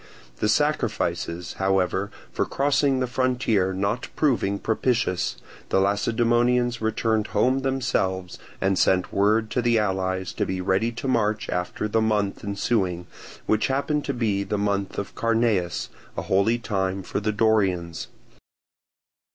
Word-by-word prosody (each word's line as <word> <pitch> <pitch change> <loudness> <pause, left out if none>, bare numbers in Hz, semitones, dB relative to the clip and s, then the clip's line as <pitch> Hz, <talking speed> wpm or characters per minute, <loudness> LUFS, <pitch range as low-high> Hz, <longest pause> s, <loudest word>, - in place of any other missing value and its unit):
The 105 - 0
sacrifices, 105 - 0
however, 95 0 +1 0.2
for - - +1
crossing 140 -1 +2
the - - +2
frontier 120 -6 +1
not 100 +6 -1
proving 115 -9 +1
propitious, 110 -4 0 0.3
the - - +3
Lacedaemonians 120 +4 +2
returned 110 0 0
home 130 +2 +3
themselves, 120 -9 -1 0.2
and 95 -1 +1
sent 90 -1 +2
word 110 +2 +2
to 125 - +1
the 120 -1 +3
allies 95 -3 -1
to - - -1
be 95 - -2
ready 95 +5 +1
to 120 +3 -5
march 110 -4 0
after 90 +4 -2
the 110 +1 +1
month 105 -3 0
ensuing, 100 -4 -1 0.4
which 110 0 +2
happened 140 +2 0
to 140 - -1
be 105 -5 0
the 100 +1 -2
month 100 -1 -1
of 100 - -4
Carneus, 115 -6 0 0.3
a - - -2
holy 100 +5 +2
time 95 -4 -2
for - - -3
the 105 +1 0
Dorians. 100 -6 +1
105 Hz, 135 wpm, -24 LUFS, 95-120 Hz, 0.4 s, the